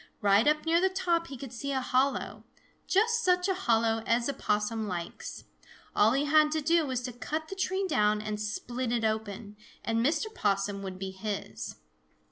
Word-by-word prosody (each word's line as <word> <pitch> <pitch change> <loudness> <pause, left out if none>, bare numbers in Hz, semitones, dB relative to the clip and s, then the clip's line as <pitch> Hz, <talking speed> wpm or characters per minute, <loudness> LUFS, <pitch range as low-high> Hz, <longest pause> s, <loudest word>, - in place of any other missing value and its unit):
Right 205 +4 +4
up 305 +1 +2
near 335 +1 +3
the 380 - +4
top 345 -3 0
he 270 - -7
could 260 -1 -8
see 280 +4 -4
a 265 - +1
hollow, 260 +2 0 0.4
just 460 +4 +2
such 360 0 +3
a 385 - +2
hollow 225 -10 +1
as 235 +1 +2
a 280 - -1
Possum 210 -2 -1
likes. 175 -3 -6 0.5
All 220 +3 +5
he 275 +2 +1
had 305 +1 +5
to 315 - 0
do 325 +1 +3
was 255 -2 -1
to 250 -1 -5
cut 310 +6 -4
the 390 - -5
tree 380 +1 0
down 210 - +2
and 210 0 -4
split 240 +3 -3
it 235 -2 +1
open, 215 -1 -3 0.3
and 230 0 +1
Mr. 320 - 0
Possum 200 - 0
would 190 -1 -6
be 190 0 -5
his. 200 +2 -5
245 Hz, 190 wpm, -29 LUFS, 210-315 Hz, 0.5 s, All